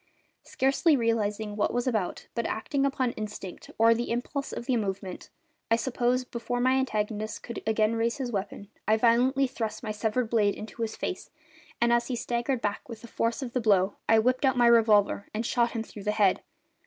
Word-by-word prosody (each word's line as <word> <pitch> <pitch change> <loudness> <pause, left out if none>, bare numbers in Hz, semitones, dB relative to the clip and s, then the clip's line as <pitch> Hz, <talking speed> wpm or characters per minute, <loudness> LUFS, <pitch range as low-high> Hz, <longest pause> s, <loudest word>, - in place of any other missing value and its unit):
Scarcely 275 +3 +2
realising 220 -3 -1
what 205 - +1
I - - -6
was 245 - 0
about, 220 -8 -1
but 235 - -1
acting 275 +5 0
upon 260 -3 0
instinct 210 -4 -7
or 230 +1 +6
the 235 +1 -3
impulse 260 +4 -3
of - - -6
the 255 - +1
moment, 195 -4 -4 0.4
I 230 - +5
suppose, 245 +1 0
before 245 0 -4
my 255 +1 +3
antagonist 215 -5 -1
could 235 - -6
again 220 0 +2
raise 230 +3 0
his 255 -3 -3
weapon 200 -1 -4 0.2
I 215 +1 +4
violently 250 +4 +3
thrust 235 -4 -4
my 215 - -3
severed 220 +2 -1
blade 210 -3 +3
into 220 +2 -8
his 220 -1 -2
face, - - -4 0.5
and 235 0 +3
as 235 0 +2
he 255 - -2
staggered 240 +2 -1
back 205 +3 -3
with 230 -1 -9
the - - -9
force 230 +3 -1
of 245 -2 -6
the 250 - 0
blow 200 -3 +2
I 225 - +6
whipped 255 +5 +2
out 265 -2 +3
my 240 - +5
revolver 215 -4 +4
and 225 +2 -1
shot 235 0 +1
him 225 -2 -2
through 210 -2 -11
the 210 - +1
head. 205 -3 +3
230 Hz, 205 wpm, -28 LUFS, 215-245 Hz, 0.5 s, or